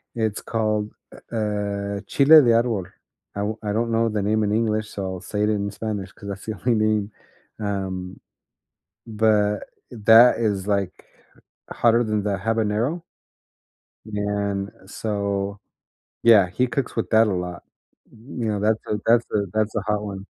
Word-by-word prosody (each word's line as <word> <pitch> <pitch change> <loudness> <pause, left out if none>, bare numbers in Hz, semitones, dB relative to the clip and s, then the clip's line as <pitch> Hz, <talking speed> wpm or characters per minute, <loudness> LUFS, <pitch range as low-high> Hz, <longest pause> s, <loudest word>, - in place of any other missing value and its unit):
it's 110 -3 -1
called 110 -2 -1 0.4
u 115 - -3
uh, 100 -1 -2
chile 150 +3 +7
de 120 -4 +3
árbol. 115 -5 +1 0.5
I 100 - -2 0.3
I - - 0
don't 115 +1 0
know 115 0 +2
the 105 -1 -1
name 110 +2 +1
in 105 - 0
English, 110 -1 0
so 100 - -6
I'll 95 -1 -5
say 105 +2 -3
it 105 - +2
in 100 -1 -1
Spanish 100 -3 -5
'cause 100 - -12
that's 100 0 -7
the 110 - -4
only 120 +2 +1
name, 110 -1 +1 0.5
um, 95 -3 -4 0.9
but, 105 -2 +1 0.2
that 115 +1 +6
is, 105 -4 -1
like, 100 -3 0 0.8
hotter 120 0 +3
than 105 -2 -1
the 100 -2 -1
habanero 115 - -1 1.0
and 100 -1 -2 0.2
so, 100 -1 -3 0.6
yeah, 105 -6 +6
he 125 +8 0
cooks 130 +1 -3
with - - -2
that 110 0 +5
a 105 - 0
lot. 90 -1 -4 0.5
You 115 0 -6
know, 105 -1 -1
that's 110 +2 +1
a 105 - -1
that's 115 +1 +4
a 105 - +1
that's 110 0 0
a 110 - 0
hot 105 +1 -1
one. 100 -2 -6
105 Hz, 160 wpm, -23 LUFS, 100-110 Hz, 1.0 s, chile